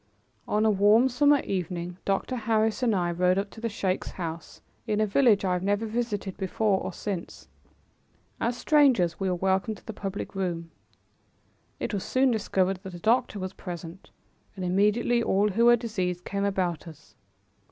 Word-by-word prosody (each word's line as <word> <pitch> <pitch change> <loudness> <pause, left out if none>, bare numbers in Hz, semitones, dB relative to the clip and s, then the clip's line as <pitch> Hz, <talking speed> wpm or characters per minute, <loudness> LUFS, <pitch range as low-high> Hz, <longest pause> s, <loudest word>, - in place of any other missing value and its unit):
On 210 +1 +1
a 220 - +5
warm 210 +5 +5
summer 285 +3 +4
evening, 180 -1 -4
Dr. 195 +6 -1
Harris 220 0 0
and 235 -4 +2
I 175 -2 0
rode 180 +2 +2
up 195 0 -2
to 220 - -12
the 230 - -1
sheik's 190 -3 -2
house 165 -2 -7 0.3
in 210 0 0
a 215 - +3
village 210 -2 +3
I 185 - +1
have 180 - -1
never 205 +3 0
visited 215 -4 -3
before 195 +1 0
or - - -4
since. 195 -5 -6 0.9
As 235 +1 -1
strangers 250 - +3
we 195 - 0
were 180 - 0
welcomed 190 +4 0
to - - -20
the 220 - -6
public 200 -1 -5
room. 170 -4 -3 1.1
It - - -3
was 200 - -2
soon 260 0 +2
discovered 195 -4 0
that 190 -3 -8
a - - -8
doctor 230 +2 +1
was 185 -1 -5
present, 175 0 -8 0.5
and 185 -2 -4
immediately 210 +6 +2
all 205 -2 +2
who 230 +4 +2
were 240 0 +8
diseased 185 -7 -3
came 200 0 -2
about 180 -5 -1
us. 160 -3 -14
200 Hz, 175 wpm, -27 LUFS, 185-225 Hz, 1.1 s, were